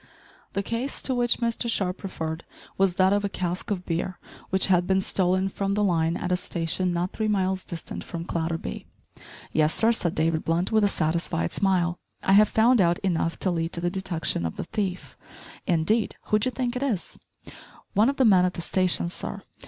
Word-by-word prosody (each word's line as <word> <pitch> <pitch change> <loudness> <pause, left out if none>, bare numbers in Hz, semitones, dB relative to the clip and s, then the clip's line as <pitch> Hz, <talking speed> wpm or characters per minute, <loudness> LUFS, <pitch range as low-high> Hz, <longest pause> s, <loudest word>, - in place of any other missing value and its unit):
The 200 - -1
case 235 +6 -2
to 265 - +1
which 240 -1 +2
Mr 235 0 -1
Sharp 190 -4 0
referred 160 -4 -4 0.3
was 195 -2 +2
that 190 +1 +4
of 205 0 +1
a 200 - 0
cask 180 -2 -3
of 185 -3 -2
beer 170 +2 -2 0.3
which 190 0 +2
had 180 -2 +3
been 190 0 +3
stolen 185 0 +1
from 195 +1 -2
the 210 - +1
line 165 -3 +1
at 180 - -3
a - - +4
station 180 +1 -1
not 175 +1 -1
three 220 - -1
miles 190 -2 0
distant 170 -2 -6
from 170 -1 -6
Clatterby. 165 -1 -3 0.6
"Yes, 155 0 +3
sir," 225 +1 +5
said 175 -7 0
David 160 0 +1
Blunt 170 +3 0
with 220 -1 +3
a - - +5
satisfied 165 -2 0
smile, 180 -3 +1 0.2
"I 195 - +3
have 210 +1 +7
found 230 +1 +4
out 170 -1 +3
enough 170 -3 0
to 185 - +2
lead 165 -1 -2
to - - -1
the 175 +1 -1
detection 175 - -2
of 80 - -3
the - - -4
thief." 185 0 -4 0.5
"Indeed, 180 +7 +1
who 215 - +4
d'ye 235 - +1
think 250 -1 -2
it 250 - -2
is?" 240 -10 -2 0.7
"One 215 +5 +4
of 275 - -2
the 265 - +4
men 190 -5 +6
at 180 0 0
the 175 - -4
station, 180 0 +1
sir. 175 - -5
185 Hz, 200 wpm, -26 LUFS, 170-205 Hz, 0.7 s, have